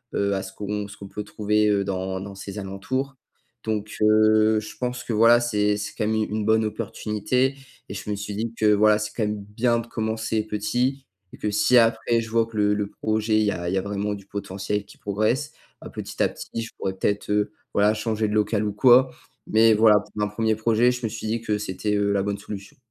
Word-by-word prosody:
heu, 100 Hz, 0 st, +1 dB
à 95 Hz, -, -1 dB
ce 95 Hz, -, -8 dB
qu'on 105 Hz, 0 st, -4 dB
ce -, -, -12 dB
qu'on 100 Hz, -, -9 dB
peut 105 Hz, -, -5 dB
trouver, 105 Hz, +1 st, +1 dB
heu, 100 Hz, -1 st, +2 dB
dans 95 Hz, -1 st, -3 dB
dans 100 Hz, +1 st, -7 dB
ces 100 Hz, +1 st, -8 dB
alentours. 130 Hz, +8 st, -3 dB, 0.5 s
Donc 105 Hz, -1 st, -3 dB
heu, 110 Hz, 0 st, +4 dB
je 110 Hz, -, -10 dB
pense 125 Hz, -1 st, -3 dB
que -, -, -5 dB
voilà, 115 Hz, +2 st, +6 dB
c'est 105 Hz, -3 st, +1 dB
c'est 105 Hz, 0 st, -5 dB
quand -, -, 0 dB
même 110 Hz, -, +1 dB
u 110 Hz, -, +1 dB
une 105 Hz, 0 st, -2 dB
bonne 110 Hz, 0 st, +3 dB
opportunité 110 Hz, +4 st, -1 dB, 0.3 s
et -, -, -5 dB
je -, -, -7 dB
me 105 Hz, -, 0 dB
suis 100 Hz, +1 st, -5 dB
dit 115 Hz, +2 st, -3 dB
que 110 Hz, -, +2 dB
voilà, 105 Hz, +1 st, +5 dB
c'est 105 Hz, 0 st, -4 dB
quand 115 Hz, -, -1 dB
même 105 Hz, -1 st, -2 dB
bien 115 Hz, +3 st, 0 dB
de 115 Hz, -, -7 dB
commencer 110 Hz, -1 st, -2 dB
petit 125 Hz, +6 st, -1 dB, 0.3 s
et -, -, -10 dB
que, 105 Hz, -, -2 dB
si 105 Hz, +4 st, +4 dB
après 115 Hz, 0 st, +3 dB
je 115 Hz, -, -7 dB
vois 115 Hz, 0 st, +2 dB
que 115 Hz, -, -14 dB
le 105 Hz, -1 st, +3 dB
le 105 Hz, -1 st, -1 dB
projet 110 Hz, +1 st, 0 dB
il -, -, +3 dB
y 105 Hz, -, +2 dB
a 85 Hz, -2 st, -4 dB
il 90 Hz, -, -1 dB
y -, -, +1 dB
a 95 Hz, -, +1 dB
vraiment 100 Hz, +1 st, -2 dB
du 100 Hz, -1 st, -9 dB
potentiel 100 Hz, +1 st, -4 dB
qui -, -, -17 dB
progresse, 110 Hz, +9 st, -1 dB, 0.3 s
bah, -, -, -9 dB
petit -, -, -6 dB
à -, -, +2 dB
petit, 115 Hz, -, -6 dB
je 115 Hz, -, -7 dB
pourrais 95 Hz, -, -2 dB
peut-être, 100 Hz, +2 st, -1 dB
heu, 105 Hz, 0 st, +1 dB, 0.2 s
voilà 105 Hz, +1 st, +4 dB
changer 110 Hz, 0 st, -1 dB
de -, -, -3 dB
local 105 Hz, 0 st, +1 dB
ou 105 Hz, -, -1 dB
quoi. 125 Hz, +3 st, +6 dB, 0.4 s
Mais 110 Hz, 0 st, +5 dB
voilà, 105 Hz, -1 st, +6 dB
pour 105 Hz, +1 st, -8 dB
un -, -, +1 dB
1er 110 Hz, +1 st, 0 dB
projet, 115 Hz, +3 st, +3 dB
je 125 Hz, 0 st, -7 dB
me 110 Hz, -, -1 dB
suis 110 Hz, -, -6 dB
dit 115 Hz, +1 st, -1 dB
que 105 Hz, -2 st, -1 dB
c'était, 105 Hz, +1 st, -2 dB
heu, 100 Hz, 0 st, +1 dB
la 100 Hz, -1 st, +1 dB
bonne 100 Hz, 0 st, -2 dB
solution. 100 Hz, -1 st, -9 dB
105 Hz, 240 wpm, -24 LUFS, 105-110 Hz, 0.5 s, voilà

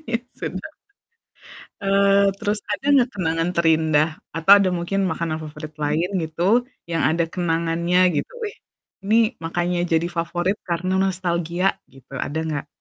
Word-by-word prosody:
Ya 230 Hz, 0 st, 0 dB, 0.2 s
sudahlah. 190 Hz, +12 st, -6 dB, 1.1 s
Eee, 200 Hz, 0 st, +4 dB
terus 210 Hz, -1 st, 0 dB
ada 270 Hz, +7 st, -4 dB
nggak 255 Hz, -2 st, +4 dB
kenangan 165 Hz, -3 st, -1 dB
terindah, 160 Hz, -2 st, +3 dB, 0.2 s
atau 165 Hz, +5 st, +4 dB
ada 200 Hz, -2 st, +3 dB
mungkin 175 Hz, +3 st, -1 dB
makanan 165 Hz, -2 st, -2 dB
favorit 155 Hz, 0 st, -8 dB
lain 155 Hz, +5 st, 0 dB, 0.2 s
gitu, 180 Hz, +10 st, +1 dB, 0.2 s
yang 165 Hz, -3 st, 0 dB
ada 165 Hz, +4 st, +2 dB
kenangannya 170 Hz, 0 st, 0 dB, 0.2 s
gitu? -, -, -2 dB, 0.2 s
"Ih, -, -, -13 dB, 0.5 s
ini 215 Hz, +3 st, +3 dB, 0.3 s
makanya 175 Hz, +1 st, -1 dB
jadi 165 Hz, +1 st, +2 dB
favorit 175 Hz, +4 st, -1 dB
karena 180 Hz, +1 st, -2 dB
nostalgia," 180 Hz, -1 st, 0 dB, 0.2 s
gitu, 135 Hz, +1 st, -18 dB
ada 150 Hz, +4 st, -3 dB
nggak? 145 Hz, -1 st, -3 dB
170 Hz, 135 wpm, -22 LUFS, 160-195 Hz, 1.1 s, Eee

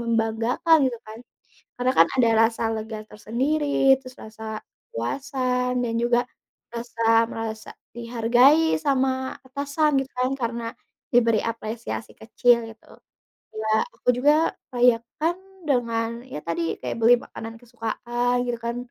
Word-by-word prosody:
membanggakan 230 Hz, +7 st, +2 dB
gitu 235 Hz, -2 st, -6 dB
kan. 220 Hz, +1 st, -9 dB, 0.6 s
Karena 255 Hz, +1 st, +1 dB
kan 165 Hz, -, +8 dB
ada 235 Hz, -3 st, +4 dB, 0.2 s
rasa 230 Hz, -, -6 dB
lega 220 Hz, 0 st, -5 dB
tersendiri, 270 Hz, +5 st, +1 dB
terus 255 Hz, -1 st, -12 dB
rasa 220 Hz, 0 st, -7 dB, 0.3 s
kepuasan, 250 Hz, -, -1 dB
dan 230 Hz, -1 st, -2 dB
juga 240 Hz, +1 st, +2 dB, 0.5 s
rasa, 235 Hz, 0 st, -5 dB, 0.3 s
merasa 220 Hz, -1 st, -5 dB, 0.3 s
dihargai 245 Hz, +7 st, +3 dB
sama 260 Hz, -2 st, 0 dB
atasan 280 Hz, +1 st, 0 dB
gitu 265 Hz, -, -21 dB
kan, 255 Hz, +1 st, +1 dB
karena 235 Hz, -2 st, -3 dB, 0.5 s
diberi 230 Hz, -3 st, +4 dB
apresiasi 230 Hz, 0 st, -5 dB
kecil 235 Hz, 0 st, +2 dB
gitu. 225 Hz, -, -17 dB, 0.7 s
Ya, 220 Hz, 0 st, -3 dB, 0.2 s
aku -, -, -10 dB
juga 295 Hz, +5 st, +3 dB, 0.2 s
rayakan 245 Hz, +8 st, +2 dB, 0.3 s
dengan 230 Hz, -4 st, +1 dB, 0.2 s
ya 255 Hz, -, -7 dB
tadi, 170 Hz, 0 st, -1 dB, 0.2 s
kayak -, -, -3 dB
beli 235 Hz, +2 st, +7 dB
makanan 225 Hz, -1 st, -9 dB
kesukaan 240 Hz, +1 st, -2 dB
gitu 235 Hz, -1 st, -2 dB
kan. 235 Hz, +1 st, -4 dB
240 Hz, 125 wpm, -24 LUFS, 225-260 Hz, 0.7 s, kan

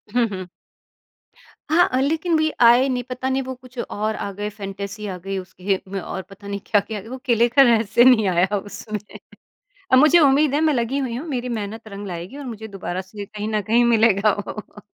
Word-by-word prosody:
हुँ, 245 Hz, -, +4 dB
हुँ। 185 Hz, -1 st, -7 dB, 1.2 s
हाँ, 335 Hz, +3 st, +5 dB
अ, 255 Hz, -, +1 dB
लेकिन 320 Hz, +4 st, 0 dB
वही 315 Hz, 0 st, +1 dB
आए 245 Hz, +3 st, +6 dB
नहीं, 250 Hz, -1 st, -1 dB
पता 255 Hz, +1 st, -3 dB
नहीं 265 Hz, +1 st, 0 dB
वो 260 Hz, 0 st, -5 dB
कुछ 255 Hz, 0 st, -18 dB
और 215 Hz, 0 st, -2 dB
आ 200 Hz, -, -4 dB
गए 210 Hz, 0 st, -3 dB
फैंटेसी 200 Hz, 0 st, -7 dB
आ 185 Hz, -2 st, -5 dB
गई 195 Hz, +2 st, -5 dB
उस 185 Hz, -1 st, -8 dB
खेत 190 Hz, +1 st, -2 dB
में 195 Hz, 0 st, -4 dB
और 190 Hz, +1 st, -5 dB
पता 200 Hz, +1 st, -13 dB
नहीं 200 Hz, 0 st, -3 dB
क्या-क्या, 210 Hz, 0 st, 0 dB
वो 260 Hz, -, -6 dB
किले 235 Hz, -1 st, +3 dB
का 275 Hz, +4 st, +5 dB
रहस्य 230 Hz, -2 st, +4 dB
नहीं 235 Hz, -6 st, +5 dB
आया 185 Hz, +3 st, +2 dB
उसमें 205 Hz, +1 st, -6 dB, 0.9 s
अ, 260 Hz, -, +7 dB
मुझे 305 Hz, +6 st, +6 dB
उम्मीद 285 Hz, -1 st, +4 dB
है 300 Hz, -, +2 dB
मैं 310 Hz, -2 st, +3 dB
लगी 240 Hz, +2 st, -1 dB
हुई 245 Hz, -4 st, -3 dB
हूँ, 305 Hz, +7 st, -6 dB
मेरी 250 Hz, -3 st, -3 dB
मेहनत 220 Hz, +2 st, -7 dB
रंग 200 Hz, 0 st, -7 dB
लाएगी 180 Hz, +9 st, -7 dB
और 285 Hz, -, -7 dB
मुझे 220 Hz, -2 st, -7 dB
दोबारा 190 Hz, -2 st, -5 dB
से 200 Hz, +2 st, -9 dB
कहीं 210 Hz, +1 st, -6 dB
न 215 Hz, -1 st, 0 dB
कहीं 230 Hz, +5 st, +3 dB
मिलेगा 220 Hz, -3 st, +4 dB, 0.2 s
वो। 210 Hz, -1 st, -9 dB
220 Hz, 215 wpm, -22 LUFS, 200-255 Hz, 1.2 s, अ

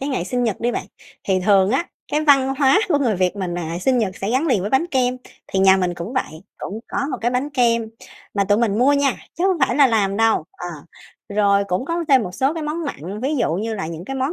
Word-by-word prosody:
cái 275 Hz, -, -3 dB
ngày 255 Hz, -11 st, -2 dB
sinh 245 Hz, +6 st, -1 dB
nhật 220 Hz, -4 st, -2 dB
đi 240 Hz, +1 st, 0 dB
bạn. -, -, -4 dB, 0.4 s
Thì 190 Hz, -1 st, +1 dB
thường 195 Hz, -2 st, +4 dB
á, 265 Hz, +8 st, +1 dB, 0.3 s
cái 300 Hz, -, +2 dB
văn 270 Hz, -2 st, +4 dB
hóa 280 Hz, +8 st, +5 dB
của 300 Hz, -5 st, +3 dB
người 240 Hz, -8 st, +1 dB
Việt 185 Hz, +2 st, 0 dB
mình 185 Hz, -3 st, -3 dB
là 170 Hz, -1 st, -4 dB
sinh 255 Hz, +6 st, +1 dB
nhật 200 Hz, -5 st, -1 dB
sẽ 195 Hz, -, -3 dB
gắn 260 Hz, +7 st, +1 dB
liền 250 Hz, -, +2 dB
với 200 Hz, +3 st, -3 dB
bánh 270 Hz, +6 st, +2 dB
kem 255 Hz, -6 st, 0 dB, 0.3 s
thì 195 Hz, -, -2 dB
nhà 190 Hz, 0 st, +6 dB
mình 180 Hz, -2 st, -1 dB
cũng 175 Hz, +6 st, -6 dB
vậy, 160 Hz, -, -3 dB, 0.2 s
cũng 210 Hz, +3 st, -6 dB
có -, -, -3 dB
một -, -, -3 dB
cái 240 Hz, -, +1 dB
bánh 255 Hz, +4 st, -1 dB
kem 235 Hz, -4 st, +1 dB, 0.5 s
mà 200 Hz, -1 st, +1 dB
tụi 205 Hz, +2 st, +2 dB
mình 220 Hz, -2 st, +1 dB
mua 265 Hz, +3 st, +4 dB
nha, 280 Hz, -2 st, +2 dB, 0.2 s
chứ 345 Hz, -, -2 dB
hông 375 Hz, -2 st, +2 dB
phải 270 Hz, -, +2 dB
là 285 Hz, -2 st, +7 dB
làm 205 Hz, -5 st, +1 dB
đâu. 225 Hz, -6 st, +2 dB
Ờ. 175 Hz, -, -8 dB, 0.6 s
Rồi 200 Hz, -1 st, +2 dB
cũng 185 Hz, +4 st, -2 dB
có 335 Hz, +3 st, -2 dB
thêm 265 Hz, -4 st, +5 dB
một 180 Hz, -, -5 dB
số 270 Hz, -, 0 dB
cái 325 Hz, -, -4 dB
món 305 Hz, +3 st, -3 dB
mặn, 200 Hz, -, -6 dB
ví 290 Hz, +4 st, 0 dB
dụ 230 Hz, -, 0 dB
như 220 Hz, +5 st, -2 dB
là 195 Hz, -6 st, -4 dB
những 165 Hz, +1 st, -7 dB
cái 270 Hz, +6 st, -5 dB
món 265 Hz, +4 st, -1 dB
230 Hz, 270 wpm, -21 LUFS, 195-270 Hz, 0.6 s, là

